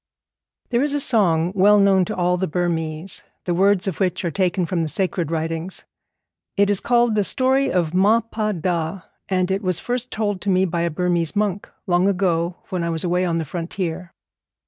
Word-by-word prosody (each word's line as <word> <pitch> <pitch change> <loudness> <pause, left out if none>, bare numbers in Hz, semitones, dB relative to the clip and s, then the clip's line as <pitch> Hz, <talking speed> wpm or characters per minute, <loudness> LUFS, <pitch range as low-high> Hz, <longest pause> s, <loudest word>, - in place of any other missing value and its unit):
_ - - -48
There 240 0 +2
is 290 0 0
a - - +1
song 180 - +2
well 205 +2 +5
known 195 -2 +4
to - - -4
all 180 0 +1
the 185 +1 -1
Burmese, 165 0 -2 0.2
the 175 - 0
words 195 +2 +3
of 190 - -3
which 185 -2 0
are 170 - -1
taken 180 0 0
from 170 0 -1
the 160 - -1
sacred 175 -1 -1
writings. 165 +2 -3 0.7
It 200 0 +4
is 200 - +3
called 240 -1 +2
the 210 -1 +2
story 265 +5 +1
of 170 -3 0
Ma 205 +5 +4
Pa 220 -1 -3
Da, 170 0 -2 0.3
and 185 -1 +1
it 195 +1 0
was 185 -3 0
first 250 0 -3
told 205 -4 -2
to 205 - -2
me 185 0 +3
by 170 -1 -2
a 170 - +1
Burmese 170 +1 -1
monk, 205 -2 -1 0.2
long 175 +1 +2
ago, 175 -3 0
when 180 -2 -2
I 170 - -1
was 165 -1 -2
away 180 +1 +1
on 170 -2 0
the 165 - -2
frontier. 175 +2 -4
185 Hz, 205 wpm, -21 LUFS, 170-200 Hz, 0.7 s, well